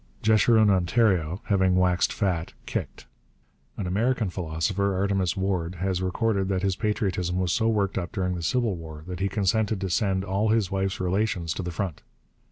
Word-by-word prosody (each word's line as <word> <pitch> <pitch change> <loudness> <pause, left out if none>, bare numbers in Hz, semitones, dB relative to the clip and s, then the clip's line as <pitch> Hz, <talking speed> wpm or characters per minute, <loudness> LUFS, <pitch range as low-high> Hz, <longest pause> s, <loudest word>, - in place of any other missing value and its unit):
Jeshurun 110 -1 +5
Ontario, 95 -2 +2
having 95 -2 +2
waxed 90 -1 +2
fat, 90 -6 -1
kicked. - - -5 0.7
An 100 - -3
American 110 +2 0
philosopher, 90 +3 -1
Artemus 95 -1 0
Ward, 95 -2 -1
has 95 +1 -1
recorded 100 +1 0
that 95 -1 -1
his 95 -2 +1
patriotism 95 -5 -1
was 90 -1 0
so 115 -1 +2
worked 100 -3 0
up 85 - -5
during 90 -3 -1
the 90 - -4
Civil 115 +3 0
War 80 -2 -9
that 90 -1 -6
he 100 +1 0
consented 105 +1 +1
to 95 -2 -3
send 95 -1 +1
all 100 +3 0
his 110 -3 +1
wife's 95 +1 -1
relations 90 -2 0
to - - -4
the 90 - -4
front. 90 -2 -4
95 Hz, 175 wpm, -26 LUFS, 90-105 Hz, 0.7 s, Jeshurun